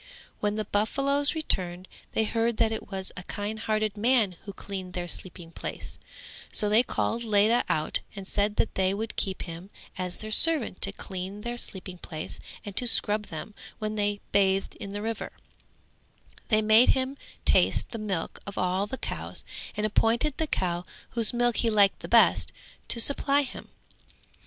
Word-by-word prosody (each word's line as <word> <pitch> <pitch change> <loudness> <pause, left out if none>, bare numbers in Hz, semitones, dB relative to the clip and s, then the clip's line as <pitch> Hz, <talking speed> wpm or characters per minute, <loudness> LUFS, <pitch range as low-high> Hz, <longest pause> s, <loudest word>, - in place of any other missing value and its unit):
When 210 0 0
the 215 0 -2
buffaloes 280 +8 +1
returned 185 - 0 0.3
they 220 - +2
heard 230 +1 0
that 225 -1 +3
it 220 - -5
was 190 -1 -2
a - - -6
kindhearted 215 +2 -2
man 225 -1 +3
who 200 - -5
cleaned 185 -1 -6
their 175 -1 -3
sleeping 175 -1 -4
place; - - -6 0.5
so 210 - +1
they 215 +3 +6
called 235 -1 -1
Ledha 215 +2 +4
out 155 - 0 0.2
and 195 -1 -7
said 205 +1 0
that - - +1
they 190 0 +1
would 220 +2 -4
keep 190 -1 -2
him 170 +2 -8 0.3
as 180 -1 -2
their 215 0 -6
servant 295 - +5
to 195 - +4
clean 190 0 -6
their 240 +2 -3
sleeping 185 -5 -7
place 155 -3 -7 0.3
and 205 -2 -7
to 245 - +3
scrub 210 -2 +2
them 165 +6 -7 0.2
when 215 0 -3
they 205 -1 -1
bathed 195 -1 +2
in 200 - -7
the 205 0 -4
river; 225 -1 -4 1.1
they 215 -1 +3
made 220 +3 +6
him 260 +1 -1 0.3
taste - - +3
the 230 - -5
milk 195 -6 -3
of 200 - -6
all 185 +2 +1
the 265 - -5
cows - - -2 0.3
and 210 - 0
appointed 230 +6 +2
the 320 - -1
cow 175 -8 -1 0.3
whose 230 -3 +4
milk 240 -1 +2
he 230 - +2
liked 205 -2 +3
best - - +5 0.4
to 235 - 0
supply 280 +3 +3
him. 260 - -7
210 Hz, 170 wpm, -28 LUFS, 190-230 Hz, 1.1 s, they